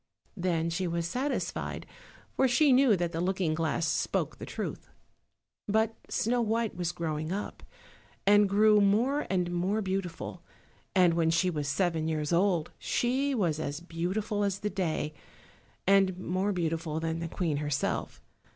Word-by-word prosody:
Then 170 Hz, -3 st, 0 dB
she 180 Hz, +2 st, -1 dB
was 170 Hz, 0 st, -1 dB
satisfied, 260 Hz, +10 st, -3 dB, 0.5 s
for 265 Hz, -, +4 dB
she 275 Hz, +3 st, +4 dB
knew 255 Hz, -4 st, +5 dB
that 175 Hz, -1 st, -1 dB
the 165 Hz, -, -2 dB
looking 180 Hz, -3 st, 0 dB
glass 160 Hz, +1 st, 0 dB
spoke 150 Hz, -, -1 dB
the -, -, -7 dB
truth. -, -, -5 dB, 0.8 s
But 220 Hz, +2 st, +2 dB, 0.2 s
Snow 240 Hz, +2 st, +1 dB
white 225 Hz, 0 st, 0 dB
was 175 Hz, -1 st, -1 dB
growing 160 Hz, -2 st, -3 dB
up, 200 Hz, +2 st, -4 dB, 0.6 s
and 205 Hz, 0 st, +5 dB
grew 210 Hz, +1 st, +5 dB
more 240 Hz, +9 st, +2 dB
and 180 Hz, -2 st, 0 dB
more 185 Hz, +5 st, 0 dB
beautiful; 185 Hz, -2 st, -4 dB, 0.5 s
and 180 Hz, -3 st, +5 dB
when 165 Hz, -1 st, +2 dB
she 170 Hz, +3 st, +2 dB
was 150 Hz, -3 st, -3 dB
seven 160 Hz, +1 st, 0 dB
years 155 Hz, 0 st, -1 dB
old 175 Hz, -2 st, +2 dB
she 265 Hz, +3 st, 0 dB
was 170 Hz, -9 st, 0 dB
as 145 Hz, -1 st, -3 dB
beautiful 185 Hz, +5 st, -2 dB
as 200 Hz, 0 st, -1 dB
the 210 Hz, -, -2 dB
day, 160 Hz, -5 st, -2 dB, 0.7 s
and 195 Hz, -1 st, +4 dB
more 185 Hz, +2 st, -1 dB
beautiful 165 Hz, -3 st, -2 dB
than 165 Hz, 0 st, -2 dB
the 165 Hz, -, -3 dB
Queen 165 Hz, -3 st, -1 dB
herself. 145 Hz, -2 st, -2 dB
180 Hz, 150 wpm, -29 LUFS, 165-205 Hz, 0.8 s, knew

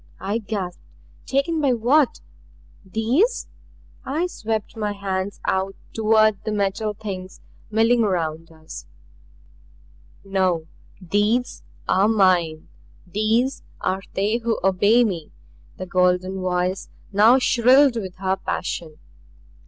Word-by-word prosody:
I 200 Hz, +4 st, -2 dB
gasped. 200 Hz, -5 st, -5 dB, 0.5 s
"Taken 290 Hz, +4 st, 0 dB
by 275 Hz, -3 st, +3 dB
what 250 Hz, +5 st, +2 dB, 0.6 s
these?" 235 Hz, -, 0 dB, 0.6 s
I 305 Hz, +6 st, -1 dB
swept 220 Hz, -, -4 dB
my 210 Hz, -2 st, -2 dB
hands 195 Hz, 0 st, -3 dB
out 190 Hz, +1 st, 0 dB, 0.2 s
toward 215 Hz, -2 st, +3 dB
the 215 Hz, -, -3 dB
Metal 210 Hz, +1 st, -1 dB
Things 190 Hz, -3 st, -7 dB, 0.3 s
milling 225 Hz, +2 st, +3 dB
around 165 Hz, -4 st, -2 dB
us. 160 Hz, -1 st, -11 dB, 1.4 s
"No! 185 Hz, -4 st, 0 dB, 0.3 s
THESE 205 Hz, +6 st, 0 dB, 0.3 s
are 195 Hz, +2 st, +3 dB
mine. 180 Hz, -7 st, +2 dB, 0.4 s
These 220 Hz, +8 st, 0 dB, 0.2 s
are 190 Hz, +1 st, -1 dB
they 205 Hz, +4 st, +1 dB
who 230 Hz, -1 st, -1 dB
obey 205 Hz, +5 st, +4 dB
me." 175 Hz, -9 st, -3 dB, 0.5 s
The 185 Hz, -, -5 dB
golden 185 Hz, +1 st, +1 dB
voice 180 Hz, +1 st, -1 dB, 0.2 s
now 220 Hz, +5 st, +6 dB
shrilled 255 Hz, +1 st, +4 dB
with 190 Hz, -5 st, -5 dB
her 190 Hz, 0 st, -1 dB
passion. 160 Hz, -5 st, -4 dB
205 Hz, 110 wpm, -22 LUFS, 185-225 Hz, 1.4 s, now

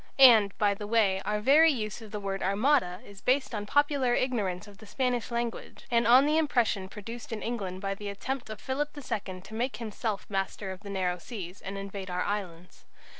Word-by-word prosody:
And, 225 Hz, -7 st, +7 dB
by 205 Hz, -1 st, +3 dB
the 205 Hz, +1 st, -7 dB
way, 205 Hz, -4 st, +3 dB
our 210 Hz, 0 st, 0 dB
very 305 Hz, +7 st, +6 dB
use 215 Hz, -4 st, -4 dB
of 220 Hz, -, -10 dB
the 210 Hz, 0 st, -5 dB
word 195 Hz, -1 st, -3 dB
"armada" 200 Hz, -2 st, +2 dB
is 200 Hz, -1 st, -13 dB
based 260 Hz, 0 st, +1 dB
on 205 Hz, -1 st, -3 dB
popular 285 Hz, -2 st, +2 dB
ignorance 205 Hz, -9 st, -1 dB
of 205 Hz, -1 st, -15 dB
the 220 Hz, -, -13 dB
Spanish 250 Hz, 0 st, -1 dB
language, 235 Hz, -1 st, -4 dB
and 235 Hz, -1 st, +3 dB
on 255 Hz, +4 st, +7 dB
the 305 Hz, +2 st, +3 dB
impression 230 Hz, -10 st, +1 dB
produced 225 Hz, +4 st, -8 dB
in 225 Hz, -, -4 dB
England 195 Hz, -6 st, -3 dB
by 195 Hz, 0 st, -1 dB
the 205 Hz, +1 st, -6 dB
attempt 245 Hz, +5 st, -4 dB
of 215 Hz, -1 st, -6 dB
Philip 290 Hz, +3 st, -3 dB
II 195 Hz, -9 st, -4 dB
to 195 Hz, +3 st, -13 dB
make 235 Hz, +1 st, -2 dB
himself 215 Hz, -2 st, -3 dB
master 195 Hz, 0 st, -3 dB
of 190 Hz, -, -8 dB
the 205 Hz, -, -10 dB
narrow 180 Hz, -2 st, -1 dB
seas, 185 Hz, -3 st, -8 dB
and 195 Hz, +1 st, -6 dB
invade 195 Hz, -1 st, -6 dB
our 180 Hz, 0 st, -1 dB
islands. 180 Hz, -4 st, -5 dB
210 Hz, 205 wpm, -29 LUFS, 195-245 Hz, -, And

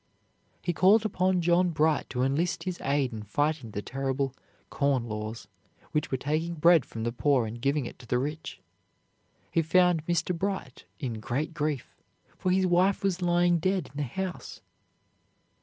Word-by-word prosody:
He 175 Hz, -, 0 dB
called 205 Hz, +6 st, +5 dB
upon 185 Hz, -3 st, +1 dB
John 175 Hz, +1 st, +3 dB
Bright 155 Hz, -1 st, +1 dB
to 125 Hz, -1 st, -1 dB
enlist 155 Hz, +7 st, 0 dB
his 185 Hz, -2 st, -4 dB
aid 140 Hz, -3 st, 0 dB
in 110 Hz, -, -5 dB
fighting 145 Hz, +4 st, -1 dB
the 105 Hz, -1 st, -5 dB
terrible 135 Hz, 0 st, -2 dB, 0.4 s
"Corn 140 Hz, -4 st, +1 dB
Laws" 110 Hz, 0 st, -5 dB, 0.4 s
which 150 Hz, +2 st, -1 dB
were 130 Hz, -, 0 dB
taking 155 Hz, +5 st, -1 dB
bread 165 Hz, -2 st, +5 dB
from 115 Hz, -, -6 dB
the 120 Hz, -, -1 dB
poor 130 Hz, 0 st, +2 dB
and 115 Hz, +2 st, -7 dB
giving 140 Hz, +1 st, +1 dB
it -, -, -9 dB
to 120 Hz, -, -13 dB
the 125 Hz, -, +1 dB
rich. 150 Hz, -, -4 dB, 0.9 s
He 165 Hz, -, +3 dB
found 175 Hz, 0 st, +3 dB
Mr. 175 Hz, +1 st, 0 dB
Bright 190 Hz, -7 st, -4 dB
in 120 Hz, -8 st, -4 dB
great 135 Hz, +8 st, -2 dB
grief, 150 Hz, -4 st, -3 dB, 0.4 s
for 185 Hz, -, -2 dB
his 190 Hz, +1 st, +3 dB
wife 185 Hz, +3 st, +3 dB
was 190 Hz, -2 st, 0 dB
lying 175 Hz, 0 st, +3 dB
dead 185 Hz, -4 st, -1 dB
in -, -, -10 dB
the 145 Hz, -2 st, -1 dB
house. 190 Hz, +4 st, -5 dB
155 Hz, 170 wpm, -28 LUFS, 130-175 Hz, 0.9 s, called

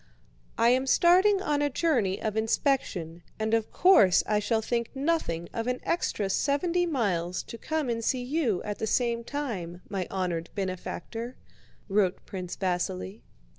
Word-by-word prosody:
"I 230 Hz, -, +5 dB
am 260 Hz, +2 st, +2 dB
starting 375 Hz, +6 st, +5 dB
on 295 Hz, -3 st, +1 dB
a 290 Hz, -, +2 dB
journey 255 Hz, -, +1 dB
of 215 Hz, -1 st, -2 dB
inspection, 220 Hz, -, 0 dB, 0.2 s
and 220 Hz, 0 st, -1 dB
of 225 Hz, -1 st, +1 dB
course 275 Hz, -, +5 dB
I 210 Hz, -1 st, +1 dB
shall 220 Hz, +1 st, 0 dB
think 235 Hz, 0 st, -1 dB
nothing 270 Hz, -, -1 dB
of 230 Hz, +1 st, -3 dB
an 250 Hz, 0 st, -1 dB
extra 215 Hz, -, -1 dB
seventy 340 Hz, -, +1 dB
miles 185 Hz, -, -1 dB
to 230 Hz, -, -9 dB
come 315 Hz, -3 st, -2 dB
and 230 Hz, -1 st, -2 dB
see 250 Hz, +2 st, 0 dB
you 250 Hz, -, 0 dB
at 205 Hz, -1 st, -4 dB
the 220 Hz, -, -1 dB
same 235 Hz, +1 st, +1 dB
time, 200 Hz, -12 st, -5 dB
my 190 Hz, -3 st, -2 dB
honored 175 Hz, -3 st, -2 dB
benefactor," 200 Hz, +5 st, -4 dB, 0.5 s
wrote 195 Hz, -2 st, +1 dB
Prince 185 Hz, -2 st, -6 dB
Vasíli. 185 Hz, +2 st, -2 dB
225 Hz, 155 wpm, -28 LUFS, 190-280 Hz, 0.5 s, I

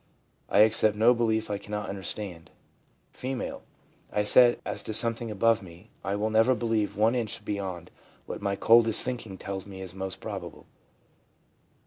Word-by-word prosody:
I 100 Hz, -, +5 dB
accept 110 Hz, -1 st, +3 dB
no 115 Hz, +3 st, +5 dB
belief 110 Hz, -2 st, 0 dB
I 100 Hz, -, -2 dB
cannot 105 Hz, 0 st, -5 dB
understand/ 95 Hz, -3 st, -6 dB, 0.6 s
F. 130 Hz, 0 st, -4 dB, 0.3 s
' -, -, -33 dB
I 105 Hz, -, 0 dB
said, 120 Hz, +3 st, +5 dB
as -, -, -2 dB
to 110 Hz, -, -3 dB
something 115 Hz, 0 st, +2 dB
above 115 Hz, +2 st, +2 dB
me, 90 Hz, +3 st, -14 dB
I 95 Hz, +1 st, -2 dB
will 110 Hz, +2 st, -1 dB
never 115 Hz, +4 st, +4 dB
believe 115 Hz, -3 st, -1 dB
one 110 Hz, +3 st, +3 dB
inch 115 Hz, -3 st, -3 dB
beyond 95 Hz, -4 st, -5 dB, 0.3 s
what -, -, -7 dB
my 100 Hz, -1 st, -1 dB
coldest 115 Hz, +1 st, +5 dB
thinking 120 Hz, -6 st, -5 dB
tells 95 Hz, 0 st, -6 dB
me 95 Hz, -1 st, -10 dB
is 95 Hz, -1 st, -6 dB
most 95 Hz, 0 st, -5 dB
probable/ -, -, -7 dB
M. -, -, -36 dB
105 Hz, 165 wpm, -27 LUFS, 100-115 Hz, 0.6 s, I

